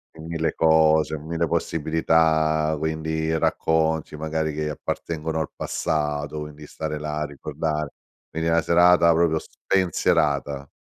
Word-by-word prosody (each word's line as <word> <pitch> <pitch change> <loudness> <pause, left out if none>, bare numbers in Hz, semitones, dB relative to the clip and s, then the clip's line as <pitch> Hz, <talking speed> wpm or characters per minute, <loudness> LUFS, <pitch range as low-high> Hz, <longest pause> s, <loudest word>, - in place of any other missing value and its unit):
in 80 0 -10
mille 80 -1 -1
cose, 80 -1 +3
mille 80 +2 -2
possibilità, 80 0 +1
quindi 80 +1 -2
racconti 80 -1 0
magari 80 0 -2
che 75 0 -2
appartengono 80 +1 -4
al 80 - -2
passato, 75 -1 -2
quindi 75 0 -9
stare 75 -1 -5
là 75 0 -3
a - - 0
ricordar 75 +1 -3 0.4
quindi 80 +1 -3
una 85 0 +3
serata 85 0 +5
proprio 80 -1 +2
spensierata. 75 -7 0
80 Hz, 120 wpm, -24 LUFS, 75-80 Hz, 0.4 s, serata